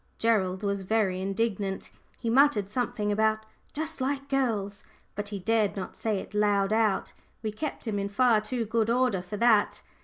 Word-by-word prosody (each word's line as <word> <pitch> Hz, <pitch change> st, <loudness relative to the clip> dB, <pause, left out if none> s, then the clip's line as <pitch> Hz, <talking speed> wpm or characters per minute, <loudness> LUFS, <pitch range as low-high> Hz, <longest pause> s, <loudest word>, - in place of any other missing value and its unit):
Gerald 195 Hz, -4 st, +1 dB
was 200 Hz, -1 st, -1 dB
very 190 Hz, -2 st, 0 dB
indignant. 195 Hz, 0 st, -2 dB, 0.3 s
He 235 Hz, -, -6 dB
muttered 230 Hz, -5 st, +3 dB
something 230 Hz, -3 st, -1 dB
about 220 Hz, +1 st, +1 dB, 0.3 s
"just 305 Hz, -2 st, -4 dB
like 275 Hz, +1 st, -2 dB
girls," 220 Hz, -7 st, -1 dB, 0.3 s
but 205 Hz, +1 st, -5 dB
he 205 Hz, -, -4 dB
dared 215 Hz, +1 st, +1 dB
not 190 Hz, -2 st, -6 dB
say 220 Hz, -3 st, -1 dB
it 190 Hz, -, -7 dB
loud 205 Hz, -1 st, +2 dB
out; 220 Hz, -3 st, +1 dB, 0.3 s
we 215 Hz, -, -1 dB
kept 290 Hz, +7 st, -5 dB
him 210 Hz, -3 st, -1 dB
in 200 Hz, 0 st, -2 dB
far 225 Hz, +1 st, +3 dB
too 230 Hz, +2 st, -2 dB
good 225 Hz, +1 st, 0 dB
order 245 Hz, -6 st, +2 dB
for 185 Hz, +4 st, -6 dB
that. 220 Hz, -2 st, +3 dB
215 Hz, 175 wpm, -28 LUFS, 200-230 Hz, 0.3 s, muttered